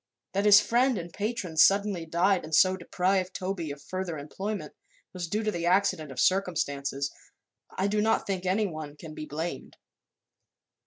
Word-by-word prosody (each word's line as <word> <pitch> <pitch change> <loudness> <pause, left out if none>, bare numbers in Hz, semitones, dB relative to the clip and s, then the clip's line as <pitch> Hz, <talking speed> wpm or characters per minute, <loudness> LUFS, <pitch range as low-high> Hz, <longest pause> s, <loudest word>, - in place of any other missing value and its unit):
That 200 +2 0
his 205 0 +9
friend 240 +3 +2
and 170 0 -7
patron 205 -6 -3
suddenly 195 -1 +4
died 175 +3 +2
and 155 0 -1
so 185 0 +5
deprived 185 +1 -1
Toby 185 -4 -3
of 140 0 -6
further 185 -3 -4
employment, 195 +9 -5 0.4
was 180 -2 -4
due 210 +6 -1
to 215 - 0
the 170 -3 -2
accident 180 -5 +2
of 130 - -7
circumstances. 140 -7 0 0.7
I 190 - +1
do 210 +1 +1
not 220 +1 +2
think 190 -2 -2
anyone 180 -6 -2
can 155 0 -9
be 155 0 -7
blamed." 160 +4 -5
185 Hz, 160 wpm, -28 LUFS, 160-200 Hz, 0.7 s, his